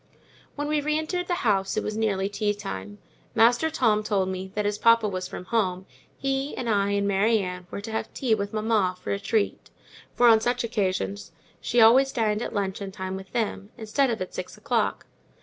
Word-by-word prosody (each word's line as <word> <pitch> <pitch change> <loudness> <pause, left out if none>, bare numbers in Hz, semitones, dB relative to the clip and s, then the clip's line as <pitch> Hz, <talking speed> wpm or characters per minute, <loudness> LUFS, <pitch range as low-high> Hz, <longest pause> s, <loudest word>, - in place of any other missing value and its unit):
When 290 0 -3
we 300 0 +1
re 305 +1 0
entered 355 +3 -2
the 350 - 0
house 195 -2 +1
it 215 - 0
was 215 - -3
nearly 200 -3 0
tea 205 +1 -1
time. 100 - -6 0.4
Master 240 +7 +4
Tom 220 -8 +2
told 200 -3 0
me 190 0 -5
that, 210 0 -1
as 205 0 -1
papa 230 -1 +5
was 185 -2 -3
from 180 - -8
home, 190 -4 0 0.3
he 270 +1 -2
and 245 - -3
I 200 -2 +2
and 200 0 +1
Mary 205 +3 +3
Ann 180 -3 -4
were 200 - -6
to 220 - -7
have 220 - -3
tea 250 -4 0
with 200 -1 -1
mamma, 215 -4 +1
for - - -5
a 200 - -1
treat; 210 +1 -1 0.5
for, 245 - +5
on 225 -1 +6
such 245 +1 0
occasions, 200 -4 -2 0.3
she 240 - 0
always 260 +5 +6
dined 220 -4 0
at - - -3
luncheon 195 -1 -3
time 190 -1 -5
with 190 0 -9
them, 210 -3 -2
instead 240 +5 +1
of 225 -2 -2
at 185 - -11
six - - -6
o'clock. - - -1
210 Hz, 205 wpm, -26 LUFS, 195-235 Hz, 0.5 s, on